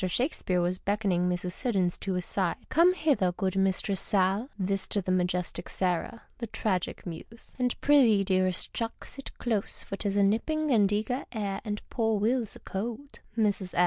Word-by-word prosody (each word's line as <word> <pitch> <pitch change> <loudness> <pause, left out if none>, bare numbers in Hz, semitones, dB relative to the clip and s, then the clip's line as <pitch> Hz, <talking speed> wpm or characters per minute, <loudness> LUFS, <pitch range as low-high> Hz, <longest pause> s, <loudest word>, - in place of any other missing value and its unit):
Shakespeare 185 - 0
was 180 +1 -1
beckoning 195 -3 +1
Mrs. 180 0 -2
Siddons 190 -4 0
to 195 - -2
his 180 0 -2
side. 185 -4 0
" - - -28
Come 350 +3 +5
hither, 275 - +2
good 190 +1 -1
mistress 195 0 +1
Sal 195 +5 +2
" - - -36
(this 195 0 -1
to 210 - 0
the 185 -1 -2
majestic 180 -1 -1
Sarah, 185 +5 -1 0.2
the 235 - -3
Tragic 190 -4 -2
Muse 185 +7 -9
!), - - -25
" - - -29
and 250 -1 0
prythcc, 240 -9 +5
dearest 185 -1 +1
clnick, 225 -1 -3
sit 275 - -6
close, 220 -5 -2
for 195 - -6
'tis 200 -1 -1
a 200 - +5
nipping 300 +10 +1
and 205 -5 +4
an 205 - +3
eager 245 +6 -2
air, 200 -4 -3
and 210 -1 -5
poor 225 -2 +1
Will's 225 +2 0
a - - -11
cold." 235 +8 -5 0.2
Mus. 205 -4 0
200 Hz, 195 wpm, -29 LUFS, 185-230 Hz, 0.2 s, Come